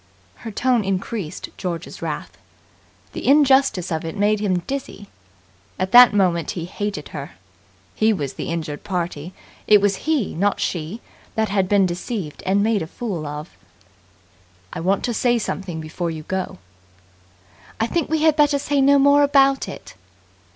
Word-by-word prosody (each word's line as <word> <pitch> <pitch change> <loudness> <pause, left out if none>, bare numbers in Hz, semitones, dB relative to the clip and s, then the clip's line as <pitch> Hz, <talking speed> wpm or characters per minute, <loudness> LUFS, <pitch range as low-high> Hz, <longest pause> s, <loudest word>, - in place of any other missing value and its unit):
Her 230 - -8
tone 245 +1 +1
increased 195 -2 -4
George's 175 -3 -5
wrath. - - -5 0.8
The - - -5
injustice 270 - +4
of 160 -1 -2
it 165 +4 -6
made 205 +1 +2
him 185 -4 0
dizzy. 265 -7 -6 0.7
At 185 +1 -2
that 245 0 +9
moment 180 -5 +1
he 165 - -3
hated 205 +3 -5
her. - - -7 0.6
He 220 +1 +2
was 145 -10 -2
the - - -5
injured 160 -3 -4
party. 175 -3 -4 0.4
It 210 -1 +7
was 200 -1 +1
he, 300 -9 +1
not 200 +4 0
she, 175 +6 -3 0.3
that 220 -2 0
had 195 -2 0
been 200 -2 +4
deceived 180 - -4
and 200 +2 +3
made 220 -2 +1
a 160 - -4
fool 180 -6 -5
of. 150 +2 -7 1.2
"I - - -5
want 190 +4 0
to 240 - -1
say 240 +1 +2
something 190 -6 -4
before 160 +2 -4
you 160 -1 -6
go." 190 - -4 1.2
"I 225 - +2
think 330 +6 -1
we 315 0 0
had 315 -2 +5
better 295 -2 +3
say 280 0 0
no 280 +1 +5
more 285 +1 +5
about 275 -1 +3
it!" - - -10
200 Hz, 160 wpm, -21 LUFS, 175-245 Hz, 1.2 s, that